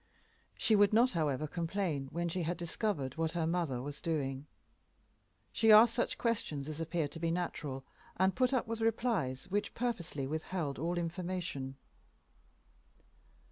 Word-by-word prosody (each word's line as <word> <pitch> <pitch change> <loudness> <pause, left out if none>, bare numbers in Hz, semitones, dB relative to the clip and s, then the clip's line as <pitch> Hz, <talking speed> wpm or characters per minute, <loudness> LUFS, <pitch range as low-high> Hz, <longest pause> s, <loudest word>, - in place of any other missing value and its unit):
She 220 - +3
would 205 0 +5
not, 240 +4 +5
however, 155 -4 0
complain 165 -3 -2
when 170 +1 -1
she 175 +2 -2
had 170 +1 -1
discovered 170 - -2
what 160 -1 0
her 170 -2 0
mother 160 -7 -1
was 145 +1 -6
doing. 140 -3 -2 1.0
She 225 -1 +4
asked 220 +2 +9
such 240 - 0
questions 155 - -1
as 155 +1 -5
appeared 165 -2 -1
to 165 - -7
be 165 0 0
natural, 150 -6 -3 0.3
and 190 +1 +3
put 255 0 +3
up 260 -3 +1
with 230 0 -4
replies 225 - 0
which 205 +1 -1
purposely 180 - -2
withheld 155 0 -3
all 170 +3 -1
information. 170 -6 -3
170 Hz, 145 wpm, -33 LUFS, 150-200 Hz, 1.0 s, asked